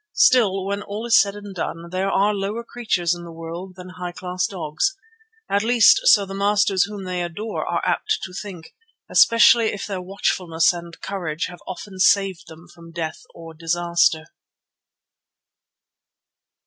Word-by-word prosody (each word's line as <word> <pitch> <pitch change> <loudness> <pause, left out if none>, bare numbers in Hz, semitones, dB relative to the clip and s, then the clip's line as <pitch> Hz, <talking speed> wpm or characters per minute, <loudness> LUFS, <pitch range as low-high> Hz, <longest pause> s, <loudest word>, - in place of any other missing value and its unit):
Still, 205 - +4
when 200 +1 -2
all 210 +3 -6
is 235 - +6
said 200 -1 -2
and 205 -1 -9
done, 170 -1 -5
there 190 +2 -1
are 200 +2 +2
lower 205 +3 -3
creatures 215 -8 -1
in 175 0 -7
the 170 - -9
world 165 +3 -8
than 180 0 -10
high 180 -1 -5
class 180 0 -2
dogs. 185 - -2 0.5
At 200 - +1
least 240 - +5
so 205 - +6
the 195 - -8
masters 200 -1 +2
whom 205 -1 -8
they 180 -1 -3
adore 205 +6 -4
are - - -1
apt 435 +1 0
to 185 - -7
think, 180 -4 -8 0.4
especially 230 0 +6
if 205 - -5
their 195 -3 -4
watchfulness 180 -3 0
and 170 -1 -9
courage 170 -5 -3
have 175 -1 -12
often 185 +2 -8
saved 190 -2 +2
them 165 +2 -14
from 165 -1 -14
death 160 -1 -5
or 165 -1 -11
disaster. 170 0 +1
185 Hz, 160 wpm, -22 LUFS, 170-205 Hz, 0.5 s, is